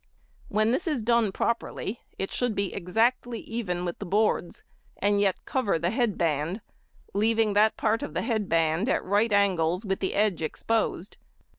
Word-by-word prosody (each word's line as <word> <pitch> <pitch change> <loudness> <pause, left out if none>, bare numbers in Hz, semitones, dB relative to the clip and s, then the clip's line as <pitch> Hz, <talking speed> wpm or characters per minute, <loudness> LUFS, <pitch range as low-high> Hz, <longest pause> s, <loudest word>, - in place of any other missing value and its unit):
When 215 +1 +2
this 305 +9 -1
is 290 -8 -1
done 230 -2 +3
properly 235 +1 -2 0.2
it 195 - -3
should 245 -4 0
be 200 -1 -1
exactly 230 +5 0
even 180 -6 -3
with 175 - -4
the 205 - -5
boards, 205 -2 0 0.3
and 205 0 +2
yet 195 -2 0
cover 240 -10 0
the 170 +3 -1
head 230 -3 0
band, 165 +5 -1 0.5
leaving 220 +1 +2
that 215 +2 +3
part 225 +2 +1
of 290 - -6
the - - 0
head 220 -5 -1
band 165 +6 +2
at - - 0
right 205 +4 +2
angles 185 -2 +2
with 195 -1 -1
the 190 - -2
edge 205 -4 +1
exposed. 205 +3 -2
205 Hz, 170 wpm, -27 LUFS, 185-225 Hz, 0.5 s, done